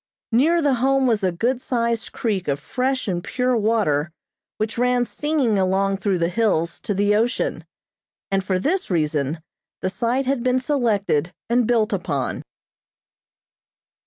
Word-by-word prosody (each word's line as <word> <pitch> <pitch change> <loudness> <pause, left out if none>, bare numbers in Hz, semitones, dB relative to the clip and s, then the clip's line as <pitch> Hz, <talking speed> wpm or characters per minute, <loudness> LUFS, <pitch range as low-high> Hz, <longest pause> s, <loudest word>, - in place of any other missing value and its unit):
Near 315 +8 +3
the 285 -2 +3
Home 270 0 +3
was 225 -5 +1
a 185 - +2
good 240 +9 -1
sized 235 -2 -1
creek 200 -6 -2
of 140 -1 0
fresh 260 - -2
and 175 -3 -2
pure 250 0 0
water, 205 -9 +1 0.5
which 215 +2 -2
ran 250 0 +2
singing 275 -8 0
along 195 +1 +1
through 195 -1 0
the 170 -1 +1
hills 175 -5 0
to 205 - -3
the 205 +1 +2
ocean, 235 +3 0 0.7
and 195 0 +1
for 185 -1 0
this 360 - -1
reason 155 -2 -1 0.4
the 185 - -1
site 240 +6 0
had 270 -1 0
been 255 +1 +2
selected 215 - 0 0.2
and 240 -1 +3
built 225 -2 +2
upon. 155 -8 -2
220 Hz, 150 wpm, -22 LUFS, 185-250 Hz, 0.7 s, Near